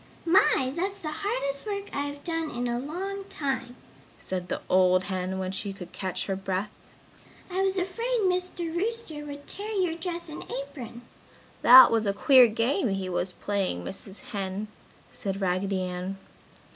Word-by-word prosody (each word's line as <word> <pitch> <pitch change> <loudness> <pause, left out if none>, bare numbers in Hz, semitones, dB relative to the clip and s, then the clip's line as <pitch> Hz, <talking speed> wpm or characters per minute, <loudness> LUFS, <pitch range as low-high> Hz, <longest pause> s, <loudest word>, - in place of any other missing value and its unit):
"My! 300 -7 +4
that's 385 +3 -1
the 315 -6 -5
hardest 400 - -2
work 400 -1 -4
I 285 0 0
have 285 0 -8
done 330 -2 -1
in 245 -1 -2
a 240 0 -1
long 380 +8 -4
time!" 270 -9 -3 0.4
said 180 -1 -4
the - - -2
old 185 0 +4
hen, 185 -1 -2
when 185 -1 -2
she 195 +1 -3
could 180 -3 -10
catch 185 -2 -3
her 195 - -1
breath. 195 +1 -2 0.8
"I 370 +2 0
was 385 0 +1
afraid 460 +7 0
Mr. 360 -3 0
Rooster 390 -6 -2
would 285 0 -8
tear 425 +2 -4
your 370 -5 +1
dress 340 +1 -4
and 310 - -7
apron!" 260 -4 -6 0.6
"That 255 +1 +10
was 225 -2 +2
a 200 - +2
queer 255 +4 +7
game 230 +3 +1
he 195 -1 -2
was 180 +1 -1
playing, 195 - -2
Mrs. 195 - -8
Hen," 200 0 -3 0.4
said 195 -1 -3
Raggedy 190 0 0
Ann. 180 +1 -4
260 Hz, 165 wpm, -27 LUFS, -, 0.8 s, That